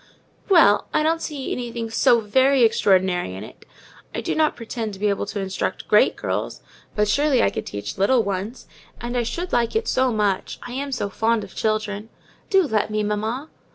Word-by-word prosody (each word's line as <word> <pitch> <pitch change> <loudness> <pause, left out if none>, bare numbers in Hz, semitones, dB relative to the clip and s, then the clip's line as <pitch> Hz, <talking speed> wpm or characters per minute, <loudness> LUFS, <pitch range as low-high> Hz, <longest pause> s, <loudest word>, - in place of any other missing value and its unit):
"Well! 320 - +5
I 305 - +3
don't 325 +1 +1
see 290 -5 -5
anything 235 -2 -4
so 230 +1 +4
very 260 +5 +3
extraordinary 190 - +2
in 95 - -7
it. - - -13 0.5
I - - -2
do - - -2
not 310 -1 +2
pretend 225 -2 -5
to 190 - -10
be 210 0 +1
able 200 0 -1
to 205 - -4
instruct 190 -1 -3
great - - +4
girls; - - -3 0.4
but 210 0 +2
surely 285 +4 +3
I - - +2
could - - -5
teach 100 - -6
little 230 +4 +3
ones: 200 +4 -4 0.3
and 240 +1 -5
I 245 - +2
should 345 +10 -4
like 235 -1 +1
it 445 0 0
so 260 0 +2
much: 205 -4 -1
I 245 - -7
am 275 +2 -4
so 250 -6 -2
fond 225 +2 0
of - - -11
children. 215 0 -2 0.4
Do 385 -1 +5
let 220 - 0
me, 215 0 -1
mamma!" 220 +8 -3
225 Hz, 195 wpm, -22 LUFS, 205-260 Hz, 0.5 s, Well